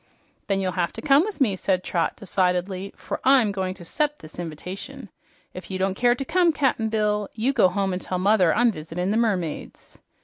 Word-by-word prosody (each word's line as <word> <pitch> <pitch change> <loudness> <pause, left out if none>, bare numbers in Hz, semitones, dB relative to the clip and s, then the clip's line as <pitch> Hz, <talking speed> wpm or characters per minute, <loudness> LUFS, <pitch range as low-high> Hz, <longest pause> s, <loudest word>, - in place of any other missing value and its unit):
"Then 195 -1 +1
you'll 190 -1 -1
have 175 -1 -1
to - - -7
come 285 -1 +5
with 415 +3 -4
me," 225 -8 +2
said 185 -1 0
Trot 170 -2 -1
decidedly, 185 0 -1
"for - - -5
I'm 260 -6 +5
going 190 -1 -3
to 175 -2 -12
'cept 295 - -2
this 155 - -12
inv'tation. 175 +3 -7 0.4
If - - -9
you 190 - -3
don't 190 0 0
care 240 +4 +3
to 275 - -5
come, 350 +3 +3
Cap'n 260 -7 0
Bill, 210 -2 0
you 240 +5 0
go 225 -8 +5
home 195 0 -1
and 180 - -3
tell 185 - -3
mother 185 -2 +3
I'm 240 +1 +3
visitin' 180 +2 -4
the 215 - +1
mermaids." 190 -9 -3
195 Hz, 205 wpm, -24 LUFS, 185-235 Hz, 0.4 s, come